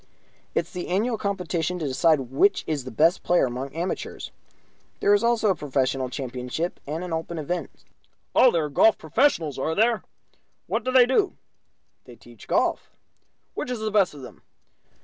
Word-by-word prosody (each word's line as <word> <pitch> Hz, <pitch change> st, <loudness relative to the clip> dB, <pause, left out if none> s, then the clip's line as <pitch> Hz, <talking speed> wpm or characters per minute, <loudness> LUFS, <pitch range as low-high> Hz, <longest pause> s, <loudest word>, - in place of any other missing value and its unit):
"It -, -, +3 dB
is 170 Hz, -, -16 dB
the 180 Hz, -, -5 dB
annual 215 Hz, +6 st, 0 dB
competition 180 Hz, -3 st, -2 dB
to 160 Hz, -4 st, -3 dB
decide 150 Hz, +3 st, +3 dB
which 200 Hz, +9 st, +3 dB
is 145 Hz, -5 st, -3 dB
the -, -, -5 dB
best 160 Hz, -, +2 dB
player 175 Hz, -4 st, +3 dB
among 130 Hz, +2 st, -4 dB
the -, -, -22 dB
amateurs. 175 Hz, +3 st, -4 dB, 0.7 s
There 205 Hz, -, +4 dB
is 205 Hz, -, +3 dB
also 230 Hz, -3 st, +3 dB
a -, -, 0 dB
Professional 135 Hz, -2 st, -1 dB
Championship, 130 Hz, +6 st, -4 dB
and 155 Hz, +4 st, -3 dB
an 180 Hz, -2 st, -5 dB
Open 165 Hz, +1 st, -4 dB
event." 165 Hz, +4 st, -3 dB, 0.6 s
"Oh, 255 Hz, -, +6 dB
there 165 Hz, -8 st, 0 dB
are -, -, -5 dB
golf 210 Hz, +9 st, +4 dB
professionals, 160 Hz, -, +1 dB
are 160 Hz, +4 st, -1 dB
there? 225 Hz, +2 st, +2 dB, 0.6 s
What -, -, -2 dB
do 255 Hz, -, -1 dB
they 255 Hz, -1 st, +7 dB
do?" 265 Hz, -, +1 dB, 0.7 s
"They -, -, -13 dB
teach -, -, -16 dB
golf." -, -, 0 dB, 0.6 s
"Which -, -, -4 dB
is 250 Hz, -2 st, -3 dB
the 215 Hz, 0 st, -2 dB
best 200 Hz, -7 st, +2 dB
of 140 Hz, -, -10 dB
them?" 125 Hz, -, -12 dB
170 Hz, 180 wpm, -25 LUFS, 145-205 Hz, 0.7 s, they